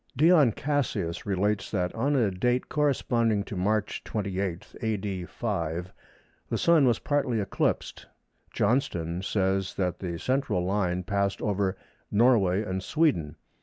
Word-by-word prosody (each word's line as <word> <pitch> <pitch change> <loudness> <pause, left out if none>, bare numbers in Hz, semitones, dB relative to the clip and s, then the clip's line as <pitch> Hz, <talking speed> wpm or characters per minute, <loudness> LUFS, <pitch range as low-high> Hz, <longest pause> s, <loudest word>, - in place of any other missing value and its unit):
Dion 155 -4 +6
Cassius 110 - -2
relates 100 +2 0
that 90 -3 -1
on 140 +6 0
a 115 -7 +2
date 125 +7 0
corresponding 120 -7 +1
to 105 - -7
March 105 +3 -1
28, 95 -4 -3
A.D. 100 -4 -2
5, 85 +3 -3 0.6
the - - 0
Sun 160 -5 +4
was 120 -2 +3
partly 140 -5 0
eclipsed. 100 - -2 0.4
Johnston 90 -8 0
says 95 -1 0
that 90 -2 -1
the 85 -3 -4
central 130 - 0
line 90 -2 0
passed 100 0 -1
over 100 -3 -1 0.3
Norway 105 -4 +3
and 95 -2 -3
Sweden. 95 - +1
100 Hz, 130 wpm, -27 LUFS, 95-120 Hz, 0.6 s, Dion